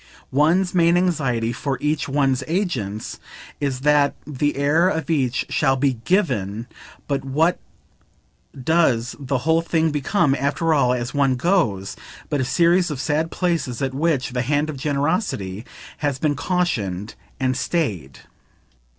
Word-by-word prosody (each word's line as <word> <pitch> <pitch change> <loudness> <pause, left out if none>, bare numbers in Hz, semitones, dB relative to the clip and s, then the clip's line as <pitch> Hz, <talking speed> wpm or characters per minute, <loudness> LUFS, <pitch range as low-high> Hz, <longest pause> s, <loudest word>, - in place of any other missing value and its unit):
One's 170 +6 +3
main 170 -1 +4
anxiety, 135 -11 0
for 135 +2 -2
each 150 -1 -1
one's 135 -2 +1
agents, 135 - -2 0.4
is 135 -3 -2
that 145 0 +3
the 145 0 -1
air 150 +6 +3
of 160 -3 -2
each 130 -6 0
shall 135 -3 +2
be 130 -3 0
GIVEN; 115 - 0 0.4
but 140 -2 -1
what 155 +6 +1 1.0
does 130 -7 +2
the 135 -1 -1
whole 160 +1 +3
thing 165 -1 +1
become, 150 +1 +1
after 140 +5 0
all, 130 -5 +3
as 120 -1 -2
one 140 -2 +2
goes, 125 - 0 0.4
but 145 - +1
a - - 0
series 175 +5 +3
of 150 -4 -4
sad 155 +3 0
places 165 -10 -1
at 135 -1 -1
which 140 -2 0
the 125 0 -1
hand 145 +4 0
of 145 - -8
generosity 140 - -1 0.3
has 145 -3 -1
been 145 +1 0
cautioned 115 - -1 0.3
and 130 -1 +1
stayed? 100 - -2
145 Hz, 140 wpm, -22 LUFS, 125-165 Hz, 1.0 s, main